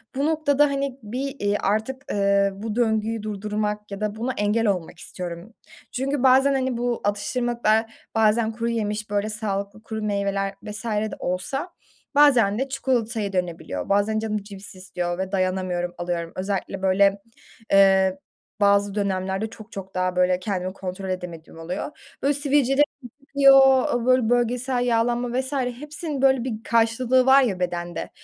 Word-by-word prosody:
bu 275 Hz, +2 st, 0 dB
noktada, 300 Hz, -2 st, +3 dB
hani, 275 Hz, -2 st, -2 dB
bir, 260 Hz, +2 st, -4 dB
ııı, 205 Hz, -, +2 dB
artık, 220 Hz, +7 st, -2 dB
ııı, 200 Hz, 0 st, +2 dB
bu 210 Hz, +2 st, -5 dB
döngüyü 220 Hz, -2 st, 0 dB
durdurmak 210 Hz, 0 st, -3 dB
ya 200 Hz, +1 st, -6 dB
da 210 Hz, 0 st, -2 dB
buna 240 Hz, +4 st, -2 dB
engel 210 Hz, +2 st, +1 dB
olmak 180 Hz, -4 st, -2 dB
istiyorum. 175 Hz, +5 st, -7 dB, 0.4 s
Çünkü 270 Hz, +1 st, -2 dB
bazen, 265 Hz, +2 st, +5 dB
hani, 260 Hz, -2 st, 0 dB
bu 240 Hz, 0 st, -1 dB
atıştırmalıklar 225 Hz, +1 st, 0 dB, 0.2 s
bazen 220 Hz, +1 st, +3 dB
kuruyemiş, 220 Hz, -2 st, -2 dB
böyle 205 Hz, +1 st, -1 dB
sağlıklı 210 Hz, -1 st, -3 dB
kuru 220 Hz, -1 st, -5 dB
meyveler 200 Hz, -1 st, -1 dB
vs. 210 Hz, +2 st, -6 dB
de 215 Hz, -1 st, -1 dB
olsa 270 Hz, -, -3 dB, 0.4 s
bazen 245 Hz, -8 st, +5 dB
de 270 Hz, +1 st, -2 dB
çikolataya 230 Hz, -6 st, -1 dB
dönebiliyor. 170 Hz, -, -3 dB
Bazen 205 Hz, +2 st, +2 dB
canım 215 Hz, -1 st, -2 dB
cips 200 Hz, -1 st, -10 dB
istiyor 175 Hz, -2 st, -4 dB
ve 190 Hz, 0 st, -3 dB
dayanamıyorum, 185 Hz, -2 st, -1 dB
alıyorum. 175 Hz, -1 st, -3 dB
Özellikle 195 Hz, 0 st, -3 dB
böyle, 195 Hz, +1 st, +3 dB, 0.5 s
ııı, 190 Hz, -1 st, +5 dB, 0.4 s
bazı 200 Hz, 0 st, +3 dB
dönemlerde 195 Hz, +1 st, -1 dB
çok 220 Hz, 0 st, -13 dB
çok 190 Hz, -1 st, -8 dB
daha 185 Hz, 0 st, 0 dB
böyle 180 Hz, 0 st, +2 dB
kendimi 185 Hz, -1 st, -3 dB
kontrol 190 Hz, 0 st, -6 dB
edemediğim 170 Hz, -3 st, -6 dB
oluyor. 180 Hz, -, -7 dB
Böyle, 280 Hz, +2 st, +2 dB
sivilcelerim 285 Hz, -1 st, +3 dB, 0.4 s
çıkıyor, 270 Hz, -1 st, +6 dB
eee, 235 Hz, -, -4 dB
böyle, 255 Hz, -3 st, +3 dB
bölgesel 245 Hz, +1 st, +1 dB
yağlanma 240 Hz, +1 st, +1 dB
vs. 265 Hz, +2 st, -3 dB
hepsinin 285 Hz, +3 st, -3 dB
böyle 265 Hz, -2 st, +4 dB
bir 225 Hz, -3 st, -4 dB
karşılığı 235 Hz, +3 st, +2 dB
var 265 Hz, +1 st, +7 dB
ya 200 Hz, -7 st, -1 dB
bedende, 175 Hz, -1 st, -3 dB
215 Hz, 145 wpm, -24 LUFS, 195-250 Hz, 0.5 s, var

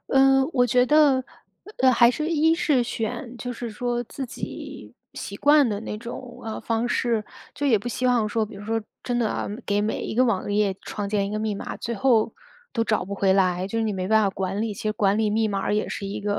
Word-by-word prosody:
呃， 270 Hz, 0 st, +5 dB
我 245 Hz, -2 st, +3 dB
觉 250 Hz, +2 st, +4 dB
得， 285 Hz, -3 st, +4 dB, 0.5 s
呃， 260 Hz, 0 st, +5 dB
还 235 Hz, 0 st, +6 dB
是 305 Hz, +5 st, -2 dB
一 320 Hz, 0 st, +3 dB
是 295 Hz, -7 st, +2 dB
选 240 Hz, +2 st, -4 dB
就 245 Hz, +2 st, -5 dB
是 235 Hz, -1 st, -6 dB
说 240 Hz, +2 st, -2 dB
自 265 Hz, +3 st, -6 dB
己 -, -, -8 dB, 0.2 s
习 -, -, -6 dB
惯 290 Hz, -3 st, +5 dB
的 205 Hz, -1 st, -2 dB
那 210 Hz, -, -5 dB
种， 245 Hz, +1 st, -8 dB
啊， 220 Hz, -1 st, -5 dB
方 230 Hz, +1 st, -1 dB
式。 230 Hz, -3 st, 0 dB, 0.3 s
就 290 Hz, -, -2 dB
也 225 Hz, -6 st, +4 dB
不 240 Hz, -, -5 dB
希 255 Hz, +1 st, -1 dB
望 235 Hz, -4 st, +2 dB
说， 220 Hz, +1 st, 0 dB
比 225 Hz, -, -12 dB
如 205 Hz, -, -9 dB
说 225 Hz, +1 st, -1 dB, 0.2 s
真 245 Hz, -1 st, -1 dB
的 225 Hz, -3 st, +1 dB
啊， -, -, -3 dB, 0.2 s
给 205 Hz, 0 st, +1 dB
每 215 Hz, +1 st, -1 dB
一 -, -, -4 dB
个 255 Hz, +2 st, +4 dB
网 205 Hz, -4 st, 0 dB
页 205 Hz, -2 st, +2 dB
创 205 Hz, -1 st, -4 dB
建 200 Hz, -1 st, 0 dB
一 200 Hz, -, -5 dB
个 215 Hz, -, -2 dB
密 215 Hz, -1 st, -1 dB
码， -, -, -6 dB
最 235 Hz, -, -4 dB
后 225 Hz, 0 st, +2 dB, 0.4 s
都 230 Hz, -2 st, 0 dB
找 215 Hz, -, 0 dB
不 200 Hz, +2 st, -5 dB
回 195 Hz, -1 st, +2 dB
来， 185 Hz, -1 st, +2 dB
就 225 Hz, +3 st, -3 dB
是 225 Hz, -, +1 dB
你 215 Hz, -, 0 dB
没 185 Hz, -1 st, -3 dB
办 220 Hz, 0 st, +4 dB
法 200 Hz, -, +2 dB
管 195 Hz, +2 st, -3 dB
理。 220 Hz, -1 st, -1 dB
其 240 Hz, -, -8 dB
实 215 Hz, -1 st, 0 dB
管 205 Hz, -2 st, +2 dB
理 215 Hz, -1 st, +1 dB
密 220 Hz, 0 st, +1 dB
码 200 Hz, 0 st, -1 dB
也 210 Hz, -, 0 dB
是 200 Hz, -, -4 dB
一 200 Hz, -, -4 dB
个 205 Hz, 0 st, -1 dB
225 Hz, 265 characters per minute, -24 LUFS, 205-250 Hz, 0.5 s, 还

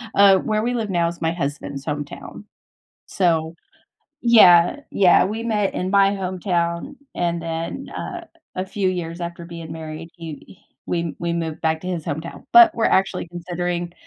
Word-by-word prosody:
Uh, 200 Hz, -1 st, +7 dB
where 215 Hz, +3 st, -1 dB
we 245 Hz, +1 st, 0 dB
live 225 Hz, -4 st, -2 dB
now 170 Hz, -3 st, +1 dB
is 170 Hz, 0 st, -6 dB
my 165 Hz, 0 st, +1 dB
husband's 140 Hz, -3 st, -4 dB
hometown. 145 Hz, +5 st, -6 dB, 0.6 s
So 165 Hz, -4 st, 0 dB, 0.7 s
Yeah, 180 Hz, -4 st, +7 dB
yeah, 180 Hz, -3 st, +5 dB
we 220 Hz, +3 st, -4 dB
met 210 Hz, -4 st, 0 dB
in 185 Hz, +1 st, -2 dB
my 200 Hz, 0 st, +4 dB
hometown, 180 Hz, +3 st, -2 dB, 0.2 s
and 170 Hz, -1 st, -1 dB
then, 165 Hz, +10 st, -4 dB
uh, 350 Hz, -1 st, -6 dB, 0.3 s
a 185 Hz, -, -1 dB
few 190 Hz, 0 st, -1 dB
years 175 Hz, -2 st, -4 dB
after 170 Hz, 0 st, -6 dB
being 165 Hz, -2 st, -9 dB
married, 160 Hz, 0 st, -7 dB
he 165 Hz, +1 st, -10 dB, 0.3 s
we 170 Hz, -2 st, -2 dB
we 170 Hz, 0 st, -1 dB
moved 165 Hz, -2 st, -3 dB
back 160 Hz, 0 st, +1 dB
to 180 Hz, -, -5 dB
his 175 Hz, -4 st, -3 dB
hometown. 160 Hz, +3 st, -5 dB
But, 350 Hz, -2 st, +8 dB
we're 225 Hz, -, +1 dB
actually 190 Hz, -2 st, +1 dB
considering 175 Hz, 0 st, -4 dB
175 Hz, 160 wpm, -22 LUFS, 165-195 Hz, 0.7 s, But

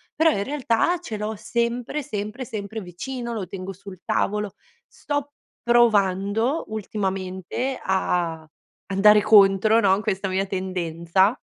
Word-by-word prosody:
però 320 Hz, 0 st, +4 dB
in 200 Hz, -, -1 dB
realtà 275 Hz, -, +1 dB
ce 285 Hz, -11 st, -6 dB
l'ho 215 Hz, +1 st, -3 dB
sempre, 235 Hz, +6 st, -2 dB
sempre, 215 Hz, 0 st, -5 dB
sempre 215 Hz, -1 st, -6 dB
vicino, 235 Hz, +7 st, -6 dB
lo 210 Hz, -5 st, -3 dB
tengo 185 Hz, +1 st, -7 dB
sul 190 Hz, -1 st, -11 dB
tavolo. 210 Hz, -1 st, -1 dB, 0.3 s
Sto 290 Hz, 0 st, -4 dB, 0.3 s
provando 225 Hz, -, +2 dB
ultimamente 195 Hz, +3 st, -3 dB
a 170 Hz, -4 st, -1 dB, 0.4 s
andare 210 Hz, +2 st, +5 dB
contro, 205 Hz, +1 st, +5 dB
no, 195 Hz, -4 st, +4 dB
a 195 Hz, -, 0 dB
questa 195 Hz, -2 st, -2 dB
mia 190 Hz, +1 st, -1 dB
tendenza. 185 Hz, +1 st, 0 dB
205 Hz, 125 wpm, -23 LUFS, 190-235 Hz, 0.4 s, andare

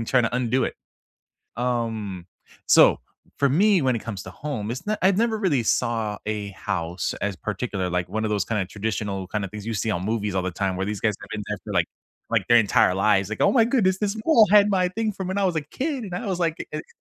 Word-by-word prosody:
and 115 Hz, -, -4 dB
trying 125 Hz, -3 st, +3 dB
to 115 Hz, -, -1 dB
undo 125 Hz, +1 st, +1 dB
it. -, -, -3 dB, 0.8 s
Um, 115 Hz, -7 st, -2 dB, 0.4 s
so -, -, +6 dB, 0.4 s
for 140 Hz, -, +3 dB
me, 190 Hz, +6 st, +4 dB
when 130 Hz, -2 st, +2 dB
it -, -, -4 dB
comes 105 Hz, -4 st, -5 dB
to -, -, -8 dB
home, 125 Hz, -8 st, -5 dB
it's 125 Hz, +9 st, -5 dB
not 215 Hz, 0 st, -1 dB
I've 190 Hz, 0 st, +4 dB
never 225 Hz, -1 st, +1 dB
really 155 Hz, -, +1 dB
saw 110 Hz, -3 st, 0 dB
a 105 Hz, -2 st, -2 dB
house 85 Hz, -1 st, -3 dB
as 100 Hz, -1 st, -1 dB
particular, 105 Hz, -3 st, -3 dB
like 90 Hz, 0 st, -1 dB
one 110 Hz, 0 st, -2 dB
of 105 Hz, -, -1 dB
those 105 Hz, -1 st, +1 dB
kind 105 Hz, -3 st, -1 dB
of 95 Hz, -, -3 dB
traditional 100 Hz, -2 st, -3 dB
kind 105 Hz, 0 st, -2 dB
of 95 Hz, -, -6 dB
things 105 Hz, 0 st, -8 dB
you 115 Hz, -, -2 dB
see 110 Hz, +2 st, -1 dB
on 90 Hz, -2 st, -2 dB
movies 105 Hz, -2 st, -1 dB
all 95 Hz, -, +1 dB
the 95 Hz, -, -2 dB
time 95 Hz, +1 st, -2 dB
where 95 Hz, -, -2 dB
these 105 Hz, -1 st, -3 dB
guys 110 Hz, -2 st, +1 dB
have -, -, -11 dB
been 110 Hz, -1 st, -4 dB
there -, -, -3 dB, 0.2 s
like -, -, +3 dB, 0.4 s
like, -, -, +1 dB
their 120 Hz, 0 st, +7 dB
entire 100 Hz, -4 st, +4 dB
lives. 95 Hz, -1 st, +2 dB
Like, 110 Hz, -, -5 dB
"Oh -, -, +4 dB
my 235 Hz, -4 st, +5 dB
goodness. 205 Hz, -6 st, +2 dB
This 210 Hz, 0 st, -1 dB
mole 230 Hz, -, +6 dB
had 210 Hz, 0 st, +7 dB
my 185 Hz, -2 st, +2 dB
thing 215 Hz, +3 st, -2 dB
from 190 Hz, -1 st, -5 dB
when 190 Hz, +2 st, -1 dB
I 200 Hz, -, +1 dB
was 180 Hz, -3 st, +1 dB
a 155 Hz, -, 0 dB
kid", 265 Hz, -, -3 dB
and 185 Hz, -, -8 dB
I 205 Hz, +5 st, -4 dB
was, 185 Hz, -2 st, -2 dB
like, 165 Hz, -1 st, +1 dB
"e -, -, -3 dB
eh". 155 Hz, -, -5 dB
115 Hz, 260 wpm, -24 LUFS, -, 0.8 s, their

